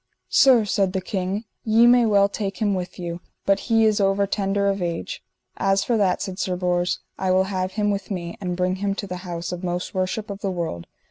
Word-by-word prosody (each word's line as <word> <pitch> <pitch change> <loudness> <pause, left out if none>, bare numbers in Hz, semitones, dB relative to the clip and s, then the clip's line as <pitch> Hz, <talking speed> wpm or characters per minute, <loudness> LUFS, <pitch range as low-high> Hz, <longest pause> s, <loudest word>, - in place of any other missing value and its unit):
Sir, 250 -5 +6
said 195 -2 +1
the 190 - 0
king, 190 +2 -3 0.2
ye 225 +1 +5
may 240 -1 +6
well 200 -2 +5
take 200 -1 -4
him 205 -2 +1
with 180 -1 -4
you, 175 -1 -5 0.2
but 195 0 +3
he 225 -1 +4
is 215 -1 +3
over 195 +1 +2
tender 200 0 0
of 195 -1 0
age. 170 -1 -4 0.3
As 195 0 +2
for 240 - +1
that, 195 -4 +1
said 190 -2 -6
Sir 185 - -1
Bors, 180 0 0 0.2
I 190 - 0
will 185 +1 +4
have 185 0 -2
him 210 -1 +1
with 195 -2 -3
me, 175 -4 -4
and 180 -2 -3
bring 185 +1 0
him 200 0 -1
to 200 - -4
the 180 -2 -5
house 175 -2 -5
of 180 +1 -5
most 180 0 -3
worship 190 +3 -2
of 200 0 -7
the 195 - -1
world. 165 - -4
195 Hz, 225 wpm, -23 LUFS, 180-205 Hz, 0.3 s, Sir